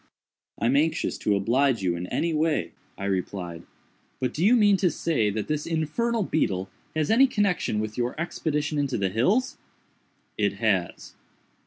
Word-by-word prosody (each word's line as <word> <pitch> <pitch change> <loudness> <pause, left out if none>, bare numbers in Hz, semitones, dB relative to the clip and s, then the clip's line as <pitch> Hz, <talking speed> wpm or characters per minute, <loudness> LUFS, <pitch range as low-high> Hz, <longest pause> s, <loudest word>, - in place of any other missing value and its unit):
"I 115 - -2
am 125 +4 +3
anxious 155 +3 +1
to 105 - +1
oblige 120 +3 +2
you 90 -2 +1
in 90 +1 -5
any 165 - -1
way," 155 0 0 0.3
I 100 - -5
replied; 90 -3 -3 0.6
"but 130 - -1
do 160 - -2
you 225 +6 +6
mean 205 -4 +5
to 185 -1 +2
say 150 -11 0
that 105 +1 -3
this 150 0 -2
infernal 205 +9 0
beetle 95 - -1 0.2
has 155 +2 +1
any 260 +5 +6
connection 200 - 0
with 110 +2 -4
your 120 +5 -2
expedition 150 -3 -2
into 140 -3 0
the 95 -2 0
hills?" 190 - +1 0.8
"It - - +2
has." - - -1
145 Hz, 165 wpm, -26 LUFS, 105-170 Hz, 0.8 s, you